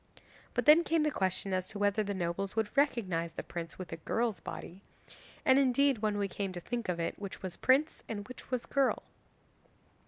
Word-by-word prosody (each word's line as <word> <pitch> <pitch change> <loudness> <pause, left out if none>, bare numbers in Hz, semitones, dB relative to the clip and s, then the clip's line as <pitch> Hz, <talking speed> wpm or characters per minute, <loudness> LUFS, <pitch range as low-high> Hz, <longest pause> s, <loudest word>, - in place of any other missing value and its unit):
But - - +1
then 310 +3 +8
came 325 -2 +2
the 300 - +2
question 190 -1 0
as 185 0 0
to 215 - -5
whether 205 +1 +2
the 200 -1 -2
nobles 185 +2 -2
would 220 -2 -1
recognise 190 - +1
the - - -5
prince 165 -1 -6
with 185 -2 -7
a - - -4
girl's 225 +6 -1
body, 180 +3 -8 0.6
and 265 +1 +6
indeed, 275 -1 +3
when 210 -1 0
we 200 -1 0
came 195 0 -3
to 175 - -4
think 235 +2 -4
of 175 -1 -1
it, 165 - -2
which 200 -1 -7
was 185 -2 -4
prince 275 +5 +2
and 205 -2 -4
which 255 - -11
was 255 -2 -1
girl? 275 -2 +1
205 Hz, 205 wpm, -32 LUFS, 185-255 Hz, 0.6 s, then